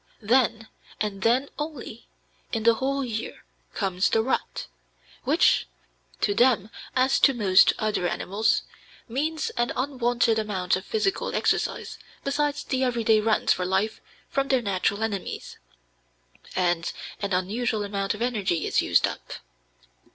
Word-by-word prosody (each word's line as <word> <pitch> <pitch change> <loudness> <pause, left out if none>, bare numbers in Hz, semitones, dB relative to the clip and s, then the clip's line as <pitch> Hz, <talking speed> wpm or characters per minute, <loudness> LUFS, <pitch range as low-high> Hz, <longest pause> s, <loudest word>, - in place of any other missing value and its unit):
Then, 225 0 +2 0.3
and 205 -2 -2
then 245 +6 +3
only, 295 -7 -6 0.4
in 225 -2 -1
the 230 0 +6
whole 270 +3 -1
year, 225 -2 -5 0.3
comes 190 -2 +1
the 225 - +2
rut, 260 - -2 0.6
which, - - +3 0.5
to 205 - +2
them 225 -2 +3 0.2
as 260 +1 +3
to 275 - +5
most 195 -5 +5
other 210 -4 0
animals, 200 +5 0 0.4
means 305 +6 -2
an 240 0 +1
unwonted 245 -4 +1
amount 190 -4 0
of 185 - -5
physical 425 -3 -1
exercise - - -1 0.2
besides 290 +1 0
the 260 0 -1
everyday 230 -3 +3
runs 220 0 +3
for 180 - -3
life 190 +4 0 0.3
from 275 0 0
their 260 -3 +2
natural 200 +1 0
enemies, 205 -4 -4 1.0
and 175 -3 0 0.3
an 200 -1 -2
unusual 210 +4 0
amount 200 0 -2
of 220 - -3
energy 205 -9 0
is - - +2
used - - +3
up. - - -6
225 Hz, 135 wpm, -26 LUFS, 200-255 Hz, 1.0 s, the